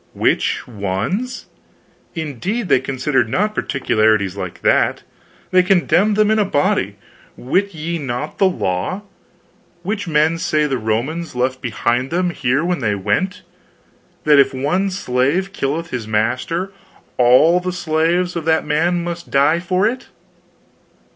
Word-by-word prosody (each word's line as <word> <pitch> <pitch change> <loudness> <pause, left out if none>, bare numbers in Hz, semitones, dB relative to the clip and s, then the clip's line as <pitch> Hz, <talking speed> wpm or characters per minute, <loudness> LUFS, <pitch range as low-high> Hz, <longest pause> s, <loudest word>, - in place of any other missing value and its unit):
"Which - - 0
ones? 120 - -3 0.7
Indeed, 170 - -3
they 130 - +5
considered 130 -2 0
not 210 - 0
particulars 110 - +1
like 90 -3 -5
to - - -20
that. - - +2 0.5
They 185 - +6
condemned 185 +2 +2
them 215 0 +3
in 220 - +2
a - - +4
body. 145 - 0 0.4
Wit 185 +9 -1
ye 165 +2 -3
not 135 +1 -5
the 195 - +5
law? 95 - -2 0.8
which 200 +1 -3
men 160 +1 +2
say 155 -2 +1
the 135 -4 -1
Romans 125 +10 -2
left 130 +1 -1
behind 120 +2 -1
them 175 +1 0
here 140 +1 0
when 180 -1 0
they 105 -5 0
went 105 - -1 0.8
that 150 -2 +5
if 135 -1 +3
one 155 +9 0
slave 180 +2 0
killeth 160 +1 -2
his 120 -4 -4
master 125 - -1 0.5
all 130 +8 +5
the 180 0 -3
slaves 175 +1 0
of 165 -2 -3
that 160 0 +2
man 170 +4 +1
must 170 0 -6
die 145 +4 +3
for 185 +3 0
it." 250 +4 -2
155 Hz, 140 wpm, -19 LUFS, 125-180 Hz, 0.8 s, They